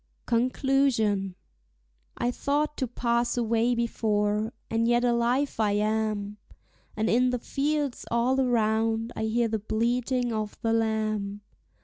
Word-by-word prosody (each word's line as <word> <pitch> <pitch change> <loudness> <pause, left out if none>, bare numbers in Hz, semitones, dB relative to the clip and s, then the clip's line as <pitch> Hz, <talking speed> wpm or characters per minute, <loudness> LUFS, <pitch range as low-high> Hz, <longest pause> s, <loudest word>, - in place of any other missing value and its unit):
CONCLUSION. 235 -5 +1 0.8
I 240 - 0
thought 295 +4 -1
to 260 - -1
pass 235 0 0
away 230 +1 +1
before, 215 -2 0 0.2
and 225 0 0
yet 240 0 +3
alive 245 +3 +1
I 210 -2 +2
am; 210 -1 -1 0.6
And 220 +1 +1
in 250 +2 +3
the 250 - 0
fields 285 +2 -2
all 245 +3 +1
around 225 -1 +1
I 220 - -2
hear 230 +2 +1
the 220 -1 -2
bleating 240 +3 0
of 215 -1 -3
the 225 0 +2
lamb. 215 -2 -1
230 Hz, 125 wpm, -27 LUFS, 215-245 Hz, 0.8 s, yet